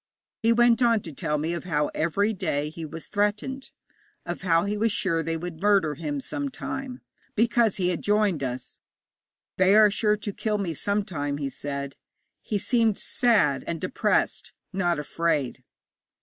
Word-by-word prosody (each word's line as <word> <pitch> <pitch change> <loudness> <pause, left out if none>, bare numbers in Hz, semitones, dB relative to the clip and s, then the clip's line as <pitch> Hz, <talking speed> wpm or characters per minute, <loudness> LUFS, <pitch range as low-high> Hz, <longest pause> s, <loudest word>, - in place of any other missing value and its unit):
He 230 - +3
went 240 +1 +4
on 230 -3 +4
to 165 - -8
tell 150 0 -1
me 160 +3 -1
of 170 - -5
how 150 -4 0
every 200 +7 +1
day 150 -6 -2
he 165 0 -7
was 160 +1 -8
threatened, 210 +6 -1 0.6
of - - -4
how 170 -1 +3
he 205 +1 -1
was 220 +2 +1
sure 170 -5 +1
they 165 0 -2
would 165 -1 -7
murder 200 -7 +3
him 145 -1 -3
some 285 - -3
time, 265 0 -6 0.3
because 230 -1 +3
he 180 -2 0
had 175 - -2
joined 205 -6 +2
us. 130 -1 -5 0.8
'They 185 +2 +5
are 215 -1 +7
sure 210 0 +2
to 205 -1 -5
kill 215 +1 -1
me 190 -5 -2
some 200 +6 -1
time,' 145 -6 -3
he 140 -2 -2
said. 140 0 -5 0.5
He 210 - -2
seemed 225 0 +2
sad 225 - +2
and 170 -1 -2
depressed, - - 0 0.2
not 175 -3 +1
afraid. 150 -2 -1
185 Hz, 170 wpm, -26 LUFS, 155-215 Hz, 0.8 s, are